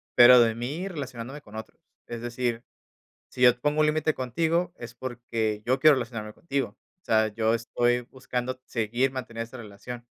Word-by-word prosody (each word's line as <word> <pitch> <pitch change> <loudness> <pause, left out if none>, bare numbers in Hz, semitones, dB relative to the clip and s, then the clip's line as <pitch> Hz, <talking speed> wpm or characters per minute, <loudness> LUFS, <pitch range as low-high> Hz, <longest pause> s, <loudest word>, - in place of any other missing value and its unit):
pero 125 0 +9
de 115 -1 +3
mí 145 +11 -4
relacionándome 135 -4 -6
con 105 -5 -15
otros. 110 - -9 0.3
Es 120 -1 -6
decir, 120 -1 -2 0.6
si 125 - -11
yo 125 0 +6
pongo 150 +2 +1
un 155 - +5
límite 155 0 +1
contigo 165 +7 0
es 120 - -9
porque 115 -4 -3
yo 130 +2 +2
quiero 155 -2 +7
relacionarme 115 -3 -4
contigo. 135 -8 -3 0.3
O - - -57
sea, 110 0 +3
yo 110 +1 +1
estoy 120 +1 +1
buscando 130 0 -4
seguir, 120 +3 0
mantener 115 -3 -5
esa 115 +3 -11
relación. 120 +2 -9
120 Hz, 170 wpm, -27 LUFS, 115-135 Hz, 0.6 s, pero